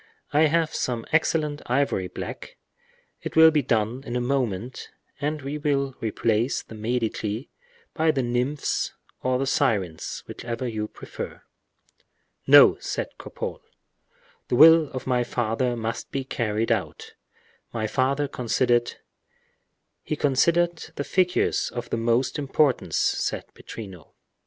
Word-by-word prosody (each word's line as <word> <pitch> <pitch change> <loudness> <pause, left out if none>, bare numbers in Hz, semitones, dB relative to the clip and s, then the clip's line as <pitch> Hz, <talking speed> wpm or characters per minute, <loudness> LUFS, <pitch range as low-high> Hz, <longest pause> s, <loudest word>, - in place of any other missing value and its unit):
"I 155 +2 +5
have 160 +1 +1
some 120 -3 -2
excellent 155 -2 +1
ivory 125 -7 +1
black; - - -8 0.6
it - - -6
will 160 0 +8
be 155 -2 +2
done 120 +1 0
in 120 - -5
a - - +1
moment, 125 -3 -2 0.3
and 150 0 -2
we 145 +2 -4
will 140 -2 0
replace 115 +2 0
the - - -13
Medici 110 0 -2 0.4
by 160 0 +1
the 140 -4 +2
nymphs 125 +4 -1 0.3
or 130 0 +1
the 135 - -1
sirens, 95 -10 -1
whichever 120 +1 -5
you 110 -2 -3
prefer." - - -8 1.0
"No," - - +8
said - - -3
Cropole, - - -6 0.9
"the - - 0
will 160 +2 +8
of 130 - -6
my 125 -2 +1
father 120 +1 -1
must 115 0 -4
be 135 - -3
carried 115 -4 -1
out. - - -2 0.6
My 110 -2 -2
father 135 +6 +1
considered—" 120 -1 +1 1.1
"He 155 - -3
considered 170 +5 +2
the 145 - -2
figures 180 +3 +1
of 120 -1 -6
the - - 0
most 115 +5 +1
importance," 140 -1 +1
said - - -1
Pittrino. 95 -8 -10
125 Hz, 130 wpm, -25 LUFS, 115-145 Hz, 1.1 s, will